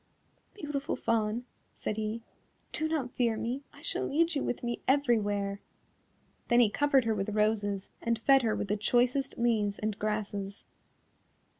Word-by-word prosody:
"Beautiful 295 Hz, -7 st, -3 dB
Fawn," 225 Hz, +1 st, 0 dB, 0.3 s
said 215 Hz, -, -3 dB
he, 220 Hz, +1 st, -3 dB, 0.5 s
"do 315 Hz, -, -1 dB
not 295 Hz, -6 st, -1 dB
fear 235 Hz, -4 st, +1 dB
me, 245 Hz, +5 st, -2 dB
I -, -, -16 dB
shall -, -, -1 dB
lead 330 Hz, +3 st, +2 dB
you 285 Hz, -, 0 dB
with 245 Hz, -, -3 dB
me 240 Hz, 0 st, -2 dB
everywhere." 205 Hz, -7 st, +2 dB, 0.9 s
Then 240 Hz, -, +5 dB
he 225 Hz, -4 st, +5 dB
covered 280 Hz, -2 st, +3 dB
her 225 Hz, -, +2 dB
with 205 Hz, 0 st, -2 dB
roses 205 Hz, -2 st, +1 dB
and 230 Hz, 0 st, +1 dB
fed 270 Hz, +4 st, +5 dB
her 225 Hz, -3 st, +1 dB
with 200 Hz, -, -3 dB
the 210 Hz, -, +1 dB
choicest 245 Hz, +5 st, +1 dB
leaves 220 Hz, -4 st, +1 dB
and 215 Hz, -1 st, -3 dB
grasses. 205 Hz, -2 st, -3 dB
230 Hz, 155 wpm, -30 LUFS, 210-260 Hz, 0.9 s, Then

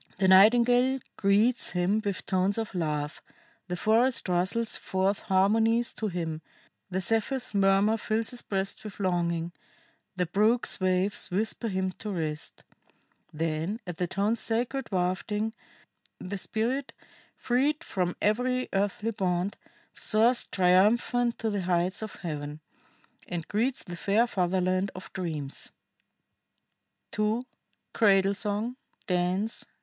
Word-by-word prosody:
The 190 Hz, 0 st, +2 dB
nightingale 245 Hz, +7 st, +6 dB, 0.2 s
greets 210 Hz, +5 st, +3 dB
him 185 Hz, +4 st, +1 dB
with 200 Hz, -3 st, -3 dB
tones 190 Hz, +2 st, +1 dB
of 225 Hz, -3 st, -3 dB
love, 150 Hz, -4 st, -2 dB, 0.5 s
the 180 Hz, -, -3 dB
forest 230 Hz, +6 st, +2 dB
rustles 185 Hz, +6 st, +1 dB
forth 190 Hz, +2 st, 0 dB
harmonies 225 Hz, +5 st, +2 dB
to 220 Hz, -, -3 dB
him, 165 Hz, -4 st, -3 dB, 0.5 s
the 190 Hz, 0 st, -1 dB
Zephyr's 225 Hz, +6 st, 0 dB
murmur 200 Hz, +2 st, +3 dB
fills 220 Hz, +2 st, -1 dB
his 245 Hz, -, -5 dB
breast 195 Hz, 0 st, -3 dB
with 210 Hz, -2 st, -9 dB
longing, 170 Hz, -3 st, 0 dB, 0.6 s
the 180 Hz, -1 st, 0 dB
brook's 215 Hz, +7 st, +2 dB
waves 185 Hz, +1 st, +1 dB
whisper 220 Hz, +5 st, -1 dB
him 190 Hz, -2 st, -1 dB
to 215 Hz, -, -5 dB
rest. 155 Hz, -5 st, -4 dB, 0.7 s
Then, 160 Hz, +6 st, -2 dB
at 175 Hz, -3 st, -6 dB
the 180 Hz, -, -1 dB
tones' 205 Hz, +5 st, 0 dB
sacred 240 Hz, +3 st, -1 dB
wafting, 200 Hz, +4 st, -1 dB, 0.7 s
the 195 Hz, +2 st, -5 dB
spirit, 245 Hz, +8 st, -2 dB, 0.4 s
freed 285 Hz, +6 st, 0 dB
from 180 Hz, -, -2 dB
every 250 Hz, +4 st, +1 dB
earthly 205 Hz, +3 st, 0 dB
bond, 185 Hz, -2 st, -1 dB, 0.4 s
soars 230 Hz, +3 st, +3 dB
triumphant 215 Hz, +6 st, +3 dB
to 225 Hz, -1 st, -2 dB
the 200 Hz, -1 st, -1 dB
heights 180 Hz, +2 st, 0 dB
of 215 Hz, -2 st, -6 dB
Heaven, 150 Hz, -3 st, -5 dB, 0.7 s
and 170 Hz, -2 st, -4 dB
greets 240 Hz, +5 st, 0 dB
the 175 Hz, -, -7 dB
fair 205 Hz, +6 st, +2 dB
fatherland 185 Hz, -2 st, 0 dB
of 185 Hz, -, -10 dB
dreams." 155 Hz, -7 st, -4 dB, 1.4 s
[II. 215 Hz, +3 st, 0 dB, 0.5 s
CRADLE 195 Hz, -2 st, +4 dB
SONG. 215 Hz, +4 st, -2 dB, 0.3 s
DANCE. 185 Hz, +4 st, 0 dB
200 Hz, 125 wpm, -28 LUFS, 180-225 Hz, 1.4 s, nightingale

